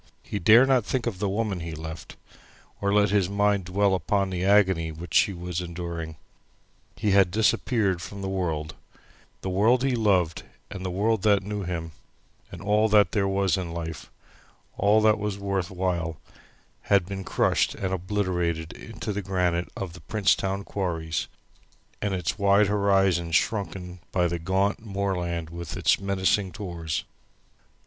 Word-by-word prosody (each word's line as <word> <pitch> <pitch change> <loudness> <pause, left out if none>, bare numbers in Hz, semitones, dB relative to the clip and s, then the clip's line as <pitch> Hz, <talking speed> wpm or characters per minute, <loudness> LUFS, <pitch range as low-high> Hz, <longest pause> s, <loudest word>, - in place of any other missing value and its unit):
He 100 - -4
dare 110 +8 +7
not 130 -3 +3
think 125 +2 -2
of 110 -6 -3
the 100 -1 0
woman 100 -2 -1
he 85 -1 -6
left, 80 0 -8 0.7
or 100 - +1
let 105 -1 +3
his 100 -3 +2
mind 100 -1 +1
dwell 100 +2 +2
upon 95 +1 0
the 90 -1 -2
agony 95 -5 +3
which 80 +1 -9
she 100 - +4
was 90 -1 -4
enduring. 85 -2 -5 0.8
He 105 - 0
had 95 -2 +5
disappeared 105 -1 +1
from 100 +2 -7
the - - -2
world, 80 -5 -2 0.7
the 95 - -3
world 115 +7 +3
he 135 -2 +1
loved, 95 -8 +2 0.3
and 95 -2 -6
the 95 - -2
world 105 +3 +1
that 100 -1 +3
knew 105 +1 -4
him, 85 -2 -4 0.6
and 90 - -9
all 105 +2 +3
that 105 -1 +5
there 100 -2 +1
was 95 -2 +1
in 85 -3 -4
life; 80 -2 -6 0.7
all 105 +2 +4
that 110 -1 +4
was 105 -1 -2
worth 100 -2 -2
while 90 -4 -2 0.7
had 100 -3 +4
been 95 +1 -5
crushed - - +1
and 95 -1 -3
obliterated 90 -4 -1
into 105 - -6
the 105 - -2
granite 90 -2 0
of 95 -4 -5
the 90 - -12
Princetown 95 +1 +1
quarries, 85 -6 -3 0.7
and 100 -2 -1
its 90 +3 -2
wide 100 +1 +5
horizon 95 -4 +2
shrunken 95 -1 -1
by 90 -2 +2
the 85 0 -3
gaunt 95 +5 0
moorland 90 -5 -2
with 85 -1 -6
its - - +3
menacing 100 0 +1
tors. 85 -7 -4
95 Hz, 160 wpm, -26 LUFS, 85-100 Hz, 0.8 s, dare